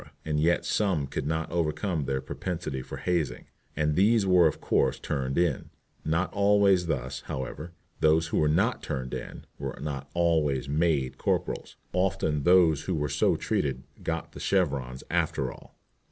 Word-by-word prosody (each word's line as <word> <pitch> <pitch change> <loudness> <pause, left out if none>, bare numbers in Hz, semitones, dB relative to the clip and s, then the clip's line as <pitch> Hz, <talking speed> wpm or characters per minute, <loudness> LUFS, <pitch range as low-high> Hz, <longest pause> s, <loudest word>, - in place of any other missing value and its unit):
And 75 -1 0
yet 85 +3 +2
some 95 -9 +1
could 70 +1 -4
not 80 +1 -2
overcome 80 -1 -1
their 65 0 -1
propensity 75 -1 -4
for - - -8
hazing, 80 -8 -1 0.3
and 75 0 +1
these 105 +3 +4
were 90 -3 +6
of 75 - -2
course 65 - +1
turned 70 -2 -2
in. 85 -6 +1 0.3
Not 85 +4 0
always 100 -3 +4
thus, 65 -5 -2
however. 75 +5 -5 0.3
Those 80 +1 +3
who - - +1
were 75 - +3
not 100 +11 +2
"turned 65 -4 -4
in" - - -6
were 70 -1 -4
not 70 -2 -5
always 80 -6 +2
"made" 75 -3 0
corporals. - - -1 0.2
Often 80 -5 0
those 85 -5 +5
who 95 - -1
were 75 -2 -1
so 70 +1 +2
treated - - -1 0.2
"got - - -3
the - - -10
chevrons" 70 -9 0
after 65 -2 0
all. - - -15
80 Hz, 160 wpm, -28 LUFS, 70-90 Hz, 0.3 s, were